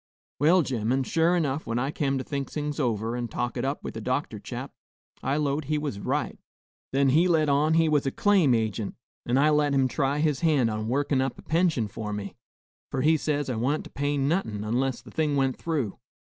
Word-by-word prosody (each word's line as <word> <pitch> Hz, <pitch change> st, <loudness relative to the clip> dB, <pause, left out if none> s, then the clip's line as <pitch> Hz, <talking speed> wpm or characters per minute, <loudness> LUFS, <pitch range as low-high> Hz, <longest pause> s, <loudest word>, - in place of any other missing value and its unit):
Well, 165 Hz, +5 st, +5 dB
gemmen, 125 Hz, 0 st, 0 dB
sure 165 Hz, +6 st, +2 dB
'nough, 145 Hz, -1 st, -2 dB
when 115 Hz, -, -1 dB
I 135 Hz, +4 st, 0 dB
kem 140 Hz, -3 st, 0 dB
to 130 Hz, -, -3 dB
think 140 Hz, -2 st, -4 dB
things 150 Hz, 0 st, -3 dB
over, 115 Hz, -3 st, 0 dB
and 120 Hz, -1 st, -3 dB
talk 120 Hz, +2 st, -3 dB
it 120 Hz, -, -2 dB
up 140 Hz, +2 st, -2 dB
with -, -, -5 dB
the -, -, -6 dB
doctor -, -, -2 dB
chap, -, -, -7 dB, 0.5 s
I 135 Hz, +2 st, 0 dB
'lowed 145 Hz, 0 st, 0 dB
he 150 Hz, +2 st, 0 dB
was 145 Hz, -9 st, -3 dB
right. -, -, -2 dB, 0.5 s
Then 135 Hz, 0 st, +3 dB
he 160 Hz, +7 st, +4 dB
let 160 Hz, -4 st, +3 dB
on 150 Hz, +3 st, +3 dB
he 165 Hz, 0 st, +4 dB
was 150 Hz, -3 st, +2 dB
a -, -, +1 dB
claim 190 Hz, -9 st, +3 dB
agint, 110 Hz, -2 st, -1 dB, 0.3 s
an' 120 Hz, +2 st, +2 dB
I 150 Hz, +3 st, +4 dB
let 150 Hz, -1 st, +2 dB
him 135 Hz, -1 st, +3 dB
try 135 Hz, +2 st, 0 dB
his 150 Hz, -2 st, +1 dB
hand 145 Hz, -9 st, +2 dB
on 110 Hz, 0 st, -3 dB
workin' 140 Hz, +2 st, +1 dB
up 135 Hz, -2 st, -2 dB
a -, -, -12 dB
pension 160 Hz, -9 st, +1 dB
for 105 Hz, +1 st, -5 dB
me, 100 Hz, -1 st, -5 dB, 0.6 s
for 130 Hz, -, -2 dB
he 160 Hz, +2 st, +5 dB
says 145 Hz, -2 st, -1 dB
I 125 Hz, -4 st, -2 dB
wa'n't 135 Hz, +7 st, 0 dB
to -, -, -11 dB
pay 145 Hz, +1 st, -1 dB
no'hun 125 Hz, -, 0 dB
'less 135 Hz, -2 st, -1 dB
the -, -, -13 dB
thing 150 Hz, -2 st, 0 dB
went 135 Hz, -2 st, +1 dB
through. 145 Hz, -11 st, -2 dB
140 Hz, 220 wpm, -26 LUFS, 120-150 Hz, 0.6 s, Well